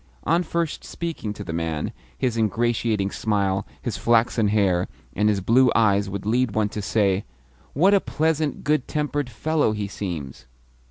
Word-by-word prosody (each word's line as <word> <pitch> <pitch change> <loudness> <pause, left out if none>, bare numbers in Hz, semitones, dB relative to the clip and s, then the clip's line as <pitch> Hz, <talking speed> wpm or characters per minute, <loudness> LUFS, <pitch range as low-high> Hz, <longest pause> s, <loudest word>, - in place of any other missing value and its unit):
On 170 +3 +2
first 170 -2 -2
speaking 165 -11 -4
to - - -7
the 80 - -5
man, 80 -2 -2 0.3
his 125 -3 0
ingratiating 110 -2 0
smile, 100 -3 0 0.2
his - - -2
flaxen 115 -1 +3
hair, 95 -4 +2 0.3
and 105 +2 +3
his 100 -2 +1
blue 120 +5 +4
eyes 100 -3 +3
would 100 0 -5
lead 120 +1 +1
one 110 -1 +2
to 105 - -5
say, 100 -1 +1 0.5
"What 185 +8 +4
a 200 - +5
pleasant, 155 -1 -1
good 150 -3 +1
tempered 145 -3 -1
fellow 145 +1 0
he 105 -1 -3
seems!" 80 -11 -6
110 Hz, 160 wpm, -24 LUFS, 100-140 Hz, 0.5 s, a